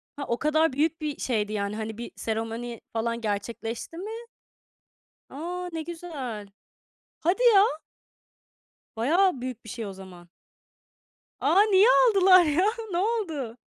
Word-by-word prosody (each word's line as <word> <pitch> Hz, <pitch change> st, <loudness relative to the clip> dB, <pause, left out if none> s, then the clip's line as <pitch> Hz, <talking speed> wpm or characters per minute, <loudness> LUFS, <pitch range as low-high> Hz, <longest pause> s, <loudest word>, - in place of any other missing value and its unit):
Ha, 285 Hz, -, -5 dB
o 235 Hz, -, 0 dB
kadar 310 Hz, -1 st, +2 dB
büyük 315 Hz, +3 st, 0 dB
bir 300 Hz, -2 st, -3 dB
şeydi 215 Hz, -4 st, -1 dB
yani. 200 Hz, 0 st, -2 dB
Hani 220 Hz, 0 st, -5 dB
bir 235 Hz, -, -7 dB
seremoni 225 Hz, +1 st, -4 dB
falan 230 Hz, +1 st, -2 dB
gerçekleşti 225 Hz, +7 st, -4 dB
mi? 410 Hz, +5 st, -6 dB, 1.2 s
A, 355 Hz, +5 st, -5 dB
ne 325 Hz, -, -3 dB
güzel. 285 Hz, -, -6 dB, 0.7 s
Hadi 360 Hz, +9 st, 0 dB
ya. 395 Hz, -, +8 dB, 1.3 s
Bayağı 315 Hz, -, +2 dB
büyük 250 Hz, -2 st, -6 dB
bir 225 Hz, -, -9 dB
şey 230 Hz, -1 st, -5 dB
o 195 Hz, -, -6 dB
zaman. 185 Hz, -2 st, -13 dB, 1.1 s
A, 400 Hz, -, +5 dB
niye 390 Hz, +2 st, +6 dB, 0.2 s
aldılar 380 Hz, -4 st, +6 dB
ya? 315 Hz, +5 st, +2 dB, 0.3 s
Ne 345 Hz, -, -1 dB
oldu? 340 Hz, -, -2 dB
265 Hz, 130 wpm, -26 LUFS, 225-345 Hz, 1.3 s, ya